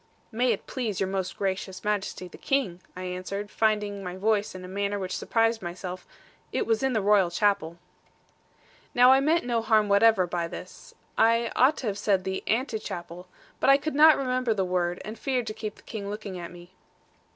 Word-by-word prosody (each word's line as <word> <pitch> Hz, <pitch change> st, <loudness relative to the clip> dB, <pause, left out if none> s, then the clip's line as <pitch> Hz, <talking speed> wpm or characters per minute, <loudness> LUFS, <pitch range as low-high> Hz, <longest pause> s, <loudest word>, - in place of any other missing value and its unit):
'May 245 Hz, +2 st, +2 dB
it 210 Hz, -, -3 dB
please 225 Hz, -8 st, -3 dB
Your 195 Hz, -, +1 dB
Most 190 Hz, -1 st, -3 dB
Gracious 190 Hz, -1 st, -3 dB
Majesty 205 Hz, -3 st, -2 dB
the -, -, -13 dB
King,' 220 Hz, -11 st, -1 dB
I 185 Hz, -, -6 dB
answered, 185 Hz, +3 st, -5 dB
finding 210 Hz, -2 st, 0 dB
my 180 Hz, -1 st, -5 dB
voice 210 Hz, 0 st, 0 dB
in 185 Hz, 0 st, -8 dB
a -, -, -8 dB
manner 200 Hz, +2 st, -2 dB
which 185 Hz, -2 st, -4 dB
surprised 225 Hz, 0 st, +1 dB
myself; 180 Hz, +1 st, -6 dB, 0.4 s
'it -, -, -1 dB
was 225 Hz, -1 st, +1 dB
in 265 Hz, -1 st, +1 dB
the 215 Hz, -3 st, 0 dB
Royal 200 Hz, -3 st, +4 dB
Chapel.' 175 Hz, -2 st, 0 dB, 1.2 s
Now 250 Hz, +1 st, +7 dB
I 265 Hz, -, +6 dB
meant 315 Hz, +3 st, +2 dB
no 235 Hz, -2 st, 0 dB
harm 215 Hz, -2 st, +3 dB
whatever 200 Hz, -1 st, +5 dB
by 170 Hz, -1 st, -2 dB
this. -, -, -11 dB, 0.2 s
I 230 Hz, +1 st, +3 dB
ought 265 Hz, +5 st, +4 dB
to -, -, -5 dB
have 205 Hz, -2 st, -2 dB
said 195 Hz, -3 st, +1 dB
the 190 Hz, 0 st, -3 dB
'Ante 230 Hz, -1 st, 0 dB
chapel,' 175 Hz, -1 st, -7 dB, 0.3 s
but -, -, +3 dB
I 275 Hz, -, +8 dB
could 310 Hz, +2 st, -4 dB
not 305 Hz, +2 st, +7 dB
remember 255 Hz, -3 st, 0 dB
the 190 Hz, -2 st, 0 dB
word, 180 Hz, -1 st, -1 dB
and 215 Hz, +2 st, -7 dB
feared 255 Hz, -3 st, -1 dB
to -, -, -4 dB
keep 215 Hz, -1 st, -6 dB
the -, -, -20 dB
King 200 Hz, -3 st, -6 dB
looking 205 Hz, -3 st, -6 dB
at 170 Hz, -, -7 dB
me. 175 Hz, +1 st, -14 dB
205 Hz, 200 wpm, -27 LUFS, 185-230 Hz, 1.2 s, I